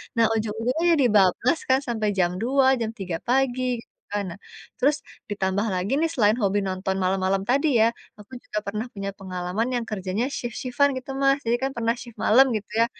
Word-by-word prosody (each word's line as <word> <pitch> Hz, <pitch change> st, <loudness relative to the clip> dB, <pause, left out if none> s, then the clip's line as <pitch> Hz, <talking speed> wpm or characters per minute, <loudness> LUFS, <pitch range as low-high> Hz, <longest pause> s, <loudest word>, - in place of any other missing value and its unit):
Nah 230 Hz, -1 st, +4 dB
ujung-ujungnya 225 Hz, +7 st, -1 dB
jadi 280 Hz, -5 st, +3 dB
bablas 210 Hz, -, +3 dB
kan 260 Hz, 0 st, +5 dB
sampai 220 Hz, -3 st, -1 dB
jam 175 Hz, -1 st, +3 dB
2, 265 Hz, +3 st, +3 dB
jam 225 Hz, -1 st, -2 dB
3 180 Hz, -3 st, -3 dB
pagi 255 Hz, 0 st, +1 dB, 0.2 s
gitu -, -, -38 dB, 0.2 s
kan. 205 Hz, 0 st, -1 dB
Nah, 185 Hz, -, -10 dB, 0.4 s
terus 290 Hz, +3 st, +3 dB, 0.3 s
ditambah 200 Hz, +1 st, -1 dB
lagi 185 Hz, +4 st, -2 dB
nih, 330 Hz, -, +2 dB
selain 215 Hz, -1 st, +3 dB
hobi 205 Hz, -2 st, +1 dB
nonton 190 Hz, 0 st, -2 dB
malam-malam 190 Hz, +1 st, +1 dB
tadi 280 Hz, +4 st, +3 dB, 0.2 s
ya, 230 Hz, -, +3 dB, 0.3 s
aku 210 Hz, +5 st, -15 dB
juga 210 Hz, -, -3 dB
pernah 210 Hz, +3 st, -3 dB
punya 200 Hz, 0 st, -4 dB
pengalaman 185 Hz, +3 st, -3 dB
yang 240 Hz, -, -1 dB
kerjanya 195 Hz, +3 st, -2 dB
shift-shift-an 255 Hz, +3 st, 0 dB
gitu 260 Hz, +1 st, -7 dB
Mas. 275 Hz, +1 st, +4 dB
Jadi 235 Hz, +1 st, +2 dB
kan 270 Hz, -, 0 dB
pernah 230 Hz, -1 st, +1 dB
shift 235 Hz, -2 st, -11 dB
malam 260 Hz, +5 st, +6 dB
gitu 210 Hz, -1 st, -5 dB
ya. 230 Hz, -, +6 dB
220 Hz, 190 wpm, -24 LUFS, 195-255 Hz, 0.4 s, malam